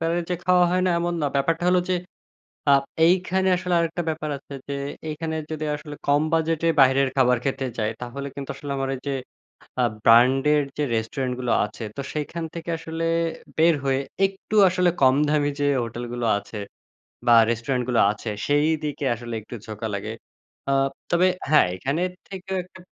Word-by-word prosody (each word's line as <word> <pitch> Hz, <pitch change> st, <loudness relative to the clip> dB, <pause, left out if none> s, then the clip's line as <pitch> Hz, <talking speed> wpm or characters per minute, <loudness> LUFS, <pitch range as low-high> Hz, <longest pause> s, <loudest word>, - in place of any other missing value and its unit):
বারেই 165 Hz, +1 st, 0 dB
যে -, -, +2 dB
খাওয়া 180 Hz, -1 st, +5 dB
হয় 185 Hz, 0 st, +1 dB
না 180 Hz, -, +3 dB
এমন 175 Hz, 0 st, -1 dB
না। -, -, +2 dB
ব্যাপারটা 165 Hz, +5 st, +1 dB
হলো 180 Hz, 0 st, +4 dB
যে -, -, +3 dB, 0.8 s
আ -, -, +7 dB, 0.3 s
এইখানে 190 Hz, +1 st, +2 dB
আসলে 180 Hz, -1 st, -1 dB
আরেকটা 170 Hz, +1 st, -1 dB
ব্যাপার 155 Hz, -1 st, -4 dB
আছে 140 Hz, -, -12 dB
যে 140 Hz, -, -2 dB, 0.3 s
এইখানে 160 Hz, +1 st, -3 dB
যদি 155 Hz, -1 st, -3 dB
আসলে 150 Hz, 0 st, -9 dB
কম 145 Hz, +1 st, +3 dB
বাজেটে 165 Hz, 0 st, +1 dB
বাহিরের 135 Hz, +1 st, +5 dB
খাবার 125 Hz, -2 st, +4 dB
খেতে 135 Hz, -1 st, -1 dB
যাই 105 Hz, 0 st, 0 dB
তাহলে 140 Hz, +3 st, -5 dB
কিন্তু 140 Hz, -1 st, -6 dB
আসলে 140 Hz, 0 st, -7 dB
আমার 135 Hz, 0 st, -2 dB
এই -, -, -11 dB
যে -, -, 0 dB, 0.7 s
আ -, -, +3 dB, 0.2 s
ব্র্যান্ডের 135 Hz, +6 st, +5 dB, 0.2 s
যে 150 Hz, -, 0 dB
রেস্টুরেন্ট 125 Hz, +3 st, -2 dB
গুলো 125 Hz, -2 st, -1 dB
আছে 110 Hz, +2 st, -9 dB
তো -, -, -2 dB
সেখান 155 Hz, +2 st, -4 dB
থেকে 170 Hz, 0 st, -7 dB
আসলে 160 Hz, 0 st, -5 dB, 0.5 s
বের 165 Hz, +1 st, +5 dB
হয়ে 135 Hz, 0 st, +2 dB, 0.3 s
একটু 195 Hz, +2 st, -4 dB
আসলে 180 Hz, 0 st, +2 dB
কম 130 Hz, -1 st, +6 dB
দামি 145 Hz, -1 st, +2 dB
যে 145 Hz, -, +1 dB, 0.2 s
হোটেল 120 Hz, +1 st, -5 dB
গুলো 120 Hz, -1 st, -2 dB
আছে 105 Hz, +1 st, -8 dB, 0.7 s
বা 120 Hz, -, +7 dB
রেস্টুরেন্ট 120 Hz, +2 st, -1 dB
গুলো 120 Hz, -, +2 dB
আছে 110 Hz, +2 st, -6 dB, 0.2 s
সেইদিকে 150 Hz, 0 st, 0 dB
আসলে 120 Hz, 0 st, -8 dB
একটু 120 Hz, -, -9 dB
ঝোকা 110 Hz, +1 st, -5 dB
লাগে। 100 Hz, +2 st, -4 dB, 0.6 s
আ -, -, +2 dB, 0.4 s
তবে 175 Hz, +2 st, +4 dB, 0.2 s
হ্যাঁ, 150 Hz, -, +6 dB
এখানের 160 Hz, -, -1 dB, 0.2 s
থেকেও 190 Hz, 0 st, -6 dB
একটা 185 Hz, +1 st, -16 dB
150 Hz, 175 wpm, -24 LUFS, 130-170 Hz, 0.8 s, আ